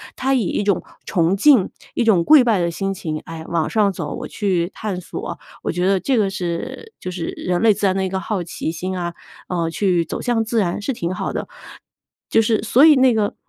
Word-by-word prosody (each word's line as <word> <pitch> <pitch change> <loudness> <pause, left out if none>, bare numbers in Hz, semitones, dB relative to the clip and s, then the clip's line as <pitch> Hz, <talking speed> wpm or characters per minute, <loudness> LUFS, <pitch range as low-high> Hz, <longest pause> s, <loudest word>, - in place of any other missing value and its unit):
他 265 +1 0
以 265 - +3
一 200 +1 -1
种 200 -2 +1 0.2
崇 175 -1 +1
敬、 255 -5 +5 0.3
一 - - +1
种 195 -7 +4
跪 305 - +7
拜 225 -5 +2
的 170 0 0
心 195 +3 -2
情， 155 -4 -4
哎， 165 -1 -7
往 165 -2 0
上 210 -3 +2
走， - - -5
我 - - -6
去 185 -4 -1
探 195 -4 -4
索， - - -6 0.3
我 - - -2
觉 180 +1 -1
得 195 -1 +3
这 260 +6 0
个 205 -3 +2
是 195 - -5
就 185 - -4
是 175 -2 -4
人 180 -1 -1
类 220 -1 +5
自 205 +1 -2
然 185 - +2
的 190 0 0
一 - - -2
个 190 - -2
好 200 -1 -2
奇 165 -1 -4
心 185 +3 -4
啊， 175 -1 -3 0.4
呃， 170 -2 -1
去 175 -1 +1
走 - - -5
向 235 -2 0
自 230 0 0
然 180 +1 -1
是 265 +6 -2
挺 175 -6 -3
好 - - -3
的。 - - -4 0.8
就 225 - +4
是 220 0 +1
所 245 +6 +5
以 310 -2 +8
那 260 -2 +5
个 215 -2 0
195 Hz, 250 characters per minute, -20 LUFS, 175-225 Hz, 0.8 s, 以